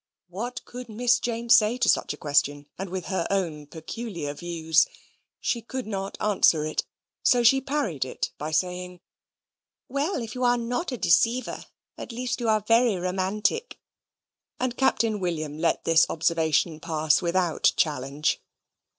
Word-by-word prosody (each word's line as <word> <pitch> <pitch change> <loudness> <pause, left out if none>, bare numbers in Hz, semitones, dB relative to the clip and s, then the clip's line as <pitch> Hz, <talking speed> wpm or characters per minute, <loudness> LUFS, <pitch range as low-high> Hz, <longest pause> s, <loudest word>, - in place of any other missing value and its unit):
What 230 +8 -5
could 250 -1 -9
Miss 245 +3 +2
Jane 235 0 -3
say 235 0 +6
to - - +1
such - - +2
a - - -6
question, 145 -1 +1
and 195 0 -5
with 185 -1 -4
her 190 -4 -1
own 165 -7 -2
peculiar 165 -1 -6
views? 160 0 +1 0.5
She 235 - -1
could 255 +3 -5
not 195 -2 -4
answer 185 -7 +3
it, 155 - -1 0.4
so 245 -1 +4
she 270 +3 +5
parried 265 - -1
it 130 - -4
by 150 - -3
saying, 180 +2 -2 0.9
"Well, 280 +8 -1
if 220 -1 -7
you 255 - -3
are 245 0 +4
not 245 +8 -2
a 250 - -3
deceiver, 235 +7 +2 0.3
at - - -7
least 250 +2 -3
you 235 -2 -1
are 215 -1 +3
very 230 -1 +4
romantic"; 190 - -1 0.8
and 255 -1 -1
Captain 225 -5 +1
William 155 -5 -3
let 165 - +1
this 165 0 +4
observation 160 -1 +1
pass 155 -1 +1
without 175 -1 +2
challenge. 145 0 0
190 Hz, 150 wpm, -26 LUFS, 160-240 Hz, 0.9 s, say